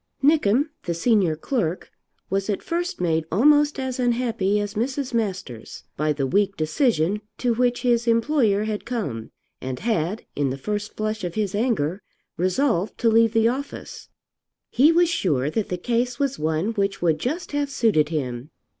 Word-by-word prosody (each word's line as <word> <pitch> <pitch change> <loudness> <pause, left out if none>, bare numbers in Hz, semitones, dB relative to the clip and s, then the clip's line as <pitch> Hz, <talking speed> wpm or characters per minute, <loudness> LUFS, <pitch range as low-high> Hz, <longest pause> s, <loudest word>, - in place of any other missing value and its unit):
Nickem, 285 -2 +3 0.2
the 170 - -1
senior 190 -3 +2
clerk, 180 - -2 0.4
was 195 +1 -1
at 200 - -1
first 345 +1 -2
made 165 -2 +1
almost 290 - +4
as 260 -1 -3
unhappy 230 -5 +1
as 205 0 -3
Mrs. 260 +4 -2
Masters 190 - -4
by 155 +1 0
the 140 -2 -1
weak 200 +8 +1
decision 170 - +1 0.2
to 245 -2 +1
which 245 +2 0
his 240 -1 +2
employer 230 -3 +2
had 215 -1 -3
come, 195 - -4 0.3
and 130 -1 -4
had 210 -2 -1
in 145 -2 0
the 130 - -3
first 210 +7 -4
flush 215 0 -2
of 175 -2 -4
his 210 -3 -1
anger 205 - 0 0.3
resolved 185 - 0
to 230 - +2
leave 225 0 +4
the 225 0 +4
office. 270 +4 -5 0.6
He 290 +6 +5
was 345 +1 +4
sure 150 - 0
that 220 +2 -2
the 180 - -2
case 240 +5 -1
was 275 -2 -1
one 160 +5 0
which 200 -4 -1
would 160 -3 +2
just 320 +7 -3
have 290 -1 -1
suited 215 - +2
him. 130 -4 -3
215 Hz, 165 wpm, -23 LUFS, 170-245 Hz, 0.6 s, He